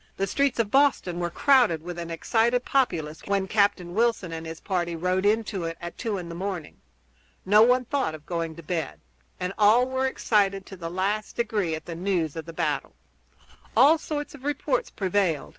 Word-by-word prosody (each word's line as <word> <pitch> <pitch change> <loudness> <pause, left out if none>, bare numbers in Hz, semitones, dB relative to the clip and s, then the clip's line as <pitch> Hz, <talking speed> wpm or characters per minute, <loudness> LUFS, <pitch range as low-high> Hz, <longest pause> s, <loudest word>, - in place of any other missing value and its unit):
The 195 - +1
streets 275 +7 0
of 225 -3 0
Boston 270 -11 +2
were 175 0 -1
crowded 235 - +3
with 175 0 -6
an 170 0 -5
excited 230 +9 +1
populace 160 - 0
when 200 -1 0
Captain 200 -4 +1
Wilson 225 -4 +1
and 165 0 -6
his 160 0 -7
party 175 -3 -2
rode 185 +3 0
into 210 -4 0
it 165 0 -4
at 175 -1 -7
two 220 -4 -3
in 175 -2 -6
the 170 - -7
morning. 180 -3 -5 0.6
No 210 +3 +6
one 250 +2 +4
thought 260 - -1
of 150 -1 -13
going 165 -2 -3
to 170 - -11
bed, 160 -3 -3 0.4
and 180 +1 -3
all 220 +4 +5
were 260 0 0
excited 200 -6 +1
to 195 - -10
the 170 -2 -6
last 200 +4 -2
degree 210 -8 0
at 160 - -9
the 170 - -6
news 170 -3 -1
of 160 -1 -5
the - - -6
battle. - - -2 0.8
All 310 +4 +7
sorts 295 -2 -4
of 280 -3 -13
reports 295 - -1
prevailed. 185 -5 0
195 Hz, 195 wpm, -26 LUFS, 170-235 Hz, 0.8 s, All